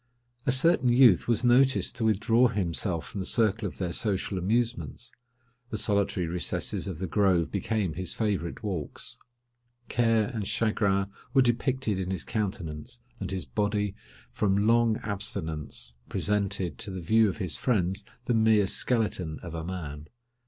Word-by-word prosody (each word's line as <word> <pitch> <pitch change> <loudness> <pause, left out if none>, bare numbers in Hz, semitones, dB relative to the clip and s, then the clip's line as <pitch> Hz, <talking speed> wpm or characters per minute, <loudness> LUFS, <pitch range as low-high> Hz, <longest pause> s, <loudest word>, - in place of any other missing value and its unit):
A - - +5
certain 130 -1 +4
youth 120 -6 +5
was 120 -1 +1
noticed 130 +2 +4
to 115 - -2
withdraw 110 +3 +3
himself 90 -4 -1
from 100 - -6
the 95 - -3
circle 110 -2 +1
of - - -9
their 90 -3 -2
social 100 -2 0
amusements: 115 +4 -1 0.6
the 110 - -3
solitary 100 -3 0
recesses 85 +2 -1
of - - -4
the 95 - -3
grove 90 -2 +2
became 100 -3 -1
his 95 +1 -2
favourite 100 -6 -2
walks. 90 -9 -3 0.7
Care 115 -2 +3
and 105 -4 -3
chagrin 100 -3 +1 0.3
were 135 - +6
depicted 120 -3 0
in 95 -1 -3
his 95 -3 -1
countenance, 105 +1 -4 0.2
and - - -4
his 95 -3 -3
body, 105 -1 -1 0.4
from 100 0 +1
long 115 -1 +3
abstinence, 80 - -4 0.2
presented 100 -7 -1
to 100 - -2
the 95 -1 -5
view 110 +4 +4
of - - -5
his 90 -7 -1
friends 95 -5 0 0.2
the 120 - +1
mere 110 -2 +4
skeleton 95 -7 0
of 85 -2 -7
a 80 -1 -4
man. 75 -4 -6
100 Hz, 150 wpm, -28 LUFS, 90-115 Hz, 0.7 s, were